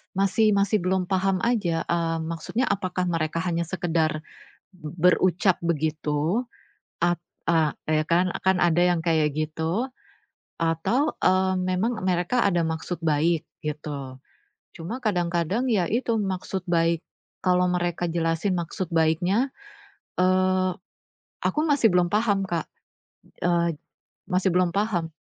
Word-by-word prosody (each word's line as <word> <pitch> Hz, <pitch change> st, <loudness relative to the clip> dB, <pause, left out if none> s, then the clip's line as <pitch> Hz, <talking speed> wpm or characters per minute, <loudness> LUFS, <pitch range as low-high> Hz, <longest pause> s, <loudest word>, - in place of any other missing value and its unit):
masih 200 Hz, +2 st, +3 dB
masih 200 Hz, +2 st, +2 dB
belum 185 Hz, 0 st, -1 dB
paham 190 Hz, 0 st, +1 dB
aja, 200 Hz, -9 st, +1 dB
mmm, 165 Hz, -1 st, 0 dB
maksudnya 220 Hz, +10 st, -2 dB
apakah 185 Hz, -2 st, -1 dB
mereka 165 Hz, 0 st, -1 dB
hanya 170 Hz, -2 st, -1 dB
sekedar, 160 Hz, -3 st, -1 dB, 0.5 s
b 165 Hz, -5 st, -9 dB
berucap 180 Hz, +2 st, +3 dB
begitu. 155 Hz, -, 0 dB, 0.6 s
Ap 175 Hz, 0 st, +1 dB, 0.2 s
a 160 Hz, -3 st, +2 dB
ya 155 Hz, 0 st, +2 dB
kan? 170 Hz, +3 st, +2 dB, 0.2 s
Kan 190 Hz, -1 st, +3 dB
ada 175 Hz, 0 st, +3 dB
yang 175 Hz, -1 st, +3 dB
kayak 155 Hz, -3 st, +2 dB
gitu. 160 Hz, +9 st, -1 dB, 0.7 s
Atau, 165 Hz, -, +1 dB
eee, 185 Hz, 0 st, +3 dB
memang 185 Hz, +4 st, -1 dB
mereka 185 Hz, +6 st, +1 dB
ada 175 Hz, -3 st, +1 dB
maksud 160 Hz, +2 st, -4 dB
baik 160 Hz, +1 st, +2 dB, 0.2 s
gitu. 145 Hz, -3 st, -5 dB, 0.6 s
Cuma 175 Hz, +9 st, -5 dB
kadang-kadang 175 Hz, +2 st, 0 dB
ya 195 Hz, -6 st, +2 dB
itu 235 Hz, +4 st, 0 dB
maksud 190 Hz, -2 st, -3 dB
baik 170 Hz, -1 st, +1 dB, 0.4 s
kalau 180 Hz, -1 st, +3 dB
mereka 175 Hz, -1 st, -1 dB
jelasin 165 Hz, +3 st, 0 dB
maksud 170 Hz, +1 st, -4 dB
baiknya, 165 Hz, -, +2 dB, 0.7 s
eee, 185 Hz, 0 st, +2 dB, 0.7 s
aku -, -, +1 dB
masih 285 Hz, -7 st, +4 dB
belum 180 Hz, -1 st, +3 dB
paham 205 Hz, -2 st, +2 dB
Kak, 170 Hz, -4 st, -2 dB, 0.8 s
eee, 170 Hz, -1 st, +2 dB, 0.6 s
masih 185 Hz, +1 st, +2 dB
belum 180 Hz, 0 st, +3 dB
paham, 195 Hz, -5 st, 0 dB
175 Hz, 125 wpm, -25 LUFS, 165-190 Hz, 0.8 s, masih